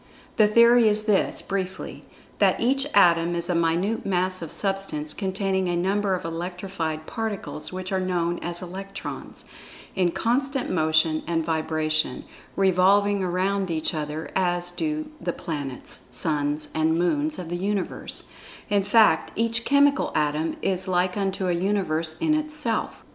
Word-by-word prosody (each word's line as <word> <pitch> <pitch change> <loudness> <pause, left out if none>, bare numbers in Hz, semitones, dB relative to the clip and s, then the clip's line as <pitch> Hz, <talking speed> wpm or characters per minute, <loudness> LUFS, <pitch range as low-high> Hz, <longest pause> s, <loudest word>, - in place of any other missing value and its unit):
The 215 -2 +6
theory 235 +2 +6
is 210 0 +3
this, 210 -3 +1
briefly: 190 -1 -4 0.3
That - - +3
each 270 +4 +2
Atom 170 -3 +5
is 170 +1 -1
a - - +1
minute 170 +6 +1
mass 185 -1 0
of 165 - -6
Substance 195 -7 -2
containing 190 -1 -1
a 175 - 0
number 195 +2 +1
of 180 - -6
"electrified 165 -1 -4
particles," 200 -9 -4
which 185 +1 -5
are 190 - +1
known 175 -2 -1
as 175 +1 -4
Electrons, 195 +2 -7 0.5
in 185 -2 +2
constant 265 +7 -1
motion 160 -1 +2
and 165 -2 0
vibration, 155 -1 -1 0.3
re[Pg 190 -1 +4
72]volving 200 +2 +3
around 190 +1 0
each 160 -2 -1
other, 155 0 -4
as 175 -1 0
do 305 - -3
the 175 - -2
planets, 145 -7 -5
suns, 145 +2 0
and 160 +1 +2
moons 295 - +1
of 175 -2 -6
the 175 - -2
Universe—in 200 +1 -2
fact 215 +2 +4
each 230 +1 -1
chemical 280 0 +3
Atom 150 +1 0
is 190 0 0
like 180 0 +1
unto 195 -2 -1
a 180 - +2
Universe 170 -4 0
in 320 -2 +2
itself. 305 -7 -2
185 Hz, 145 wpm, -25 LUFS, 165-205 Hz, 0.5 s, The